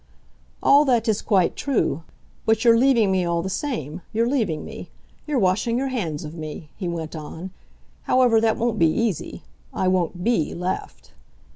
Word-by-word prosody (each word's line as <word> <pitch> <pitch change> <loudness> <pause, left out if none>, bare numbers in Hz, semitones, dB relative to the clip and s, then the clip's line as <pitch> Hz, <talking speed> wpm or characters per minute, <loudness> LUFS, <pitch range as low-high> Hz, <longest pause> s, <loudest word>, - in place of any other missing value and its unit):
"All 285 +1 +6
that 240 -4 +2
is 215 -2 +1
quite 190 -4 +2
true. 250 - 0 0.5
But 220 +1 +2
you're 230 -1 +7
leaving 235 -5 +4
me, 190 -1 +2
all 170 -1 0
the 190 - -3
same, 185 - -4
you're 230 +2 +1
leaving 220 - -1
me - - -9 0.4
you're 295 -2 0
washing 220 +3 +1
your 270 +1 -1
hands 170 - -3
of 150 0 -7
me," 155 -1 -8
he 185 - -4
went 165 -2 -4
on. 160 +4 -7 0.6
"However, 245 -3 +4
that 225 -1 +2
won't 230 -2 -1
be 165 - +5
easy; 215 0 -2 0.3
I 190 - -1
won't 180 -1 0
BE 225 -9 +1
left." 180 +2 -5
195 Hz, 170 wpm, -23 LUFS, 170-235 Hz, 0.6 s, you're